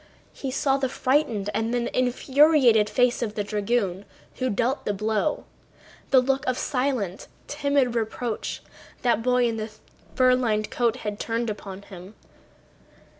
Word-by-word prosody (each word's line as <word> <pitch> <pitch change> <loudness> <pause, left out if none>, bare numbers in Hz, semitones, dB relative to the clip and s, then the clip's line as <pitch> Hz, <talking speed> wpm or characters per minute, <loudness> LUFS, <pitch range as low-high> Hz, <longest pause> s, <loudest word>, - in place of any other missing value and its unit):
He 270 - -5
saw 270 +1 +1
the 265 -1 -1
frightened 250 -7 0
and 225 +2 -1
then 240 -1 0
infuriated 255 -3 +4
face 245 +1 +2
of 215 -3 -3
the 205 - -1
dragoon 205 -2 -1 0.3
who 255 0 0
dealt 245 +6 0
the 205 - -1
blow, 215 +7 -1 0.7
the 265 - +6
look 265 +1 0
of 255 -1 +1
silent, 250 -8 -2 0.2
timid 280 -4 +1
reproach 230 0 -3 0.4
that 240 -2 +2
boy 250 +1 +2
in 230 -1 -2
the 215 0 -4 0.5
fur 255 -1 +5
lined 220 -4 0
coat 235 -1 +1
had 210 0 -3
turned 230 0 -1
upon 200 -1 -8
him. 190 +2 -12
235 Hz, 145 wpm, -25 LUFS, 210-255 Hz, 0.7 s, the